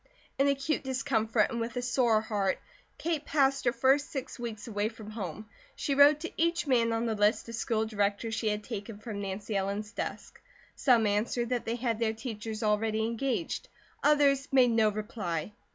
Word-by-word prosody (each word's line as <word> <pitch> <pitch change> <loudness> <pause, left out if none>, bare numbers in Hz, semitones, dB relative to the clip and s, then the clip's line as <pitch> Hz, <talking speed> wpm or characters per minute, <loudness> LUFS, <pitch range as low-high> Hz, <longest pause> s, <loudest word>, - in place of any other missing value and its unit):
In 275 - +4
acute 280 +2 0
discomfort 240 -5 +1
and 235 - -2
with 230 +1 -3
a 245 - -1
sore 240 -3 +3
heart, 205 -3 0 0.4
Kate 320 -3 -1
passed 275 -3 +2
her 240 - +4
first 270 +3 +2
six 270 -2 -5
weeks 230 -3 -5
away 210 -1 -1
from 220 -2 -10
home. 210 -2 -6 0.3
She 285 - -1
wrote 285 +2 +6
to 340 - -4
each 335 0 +1
man 235 -4 +3
on 225 +1 0
the 225 - 0
list 210 +2 +2
of - - -6
school 220 -1 0
directors 210 +1 -1
she 220 0 -1
had 210 0 -2
taken 210 -1 -6
from 210 -1 -6
Nancy 200 +2 -4
Ellen's 200 +2 -2
desk. - - -6 0.3
Some 240 -5 +4
answered 220 +3 0
that 250 -2 -1
they 230 - -1
had 235 -2 -1
their 225 -1 +1
teachers 220 -1 -5
already 215 +1 +1
engaged, 250 +7 -2 0.4
others 285 -2 +4
made 255 -3 +5
no 225 -2 +4
reply. 205 -5 -4
230 Hz, 185 wpm, -30 LUFS, 215-260 Hz, 0.4 s, wrote